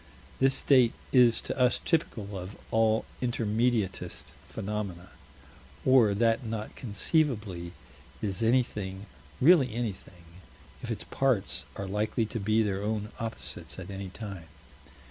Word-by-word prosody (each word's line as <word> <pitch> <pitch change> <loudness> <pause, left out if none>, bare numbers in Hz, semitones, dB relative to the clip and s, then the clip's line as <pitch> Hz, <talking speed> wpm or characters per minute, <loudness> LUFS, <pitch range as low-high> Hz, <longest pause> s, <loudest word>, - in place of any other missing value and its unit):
This 135 0 +4
state 130 -4 +4 0.2
is 125 -3 +6
to - - -4
us 125 -1 +3
typical 110 - -1
of 95 +2 -7
all 110 0 +3 0.2
intermediatist 115 -3 -1 0.2
phenomena; 100 -4 -4 0.8
or 120 -6 +5
that 115 +3 +2
not 110 -2 -5
conceivably 105 - 0 0.5
is 100 +1 -3
anything 105 -5 0 0.3
really 135 -5 +5
anything, 100 -6 -5 0.6
if - - -6
its - - -3
parts 130 -8 0
are 100 - -4
likely 105 +3 0
to 110 +2 -4
be 110 +2 +2
their 100 -2 -1
own 105 0 -2
opposites 115 0 -6
at 95 +1 -7
any 95 -1 -5
time. 95 -4 -8
110 Hz, 125 wpm, -29 LUFS, 100-120 Hz, 0.8 s, is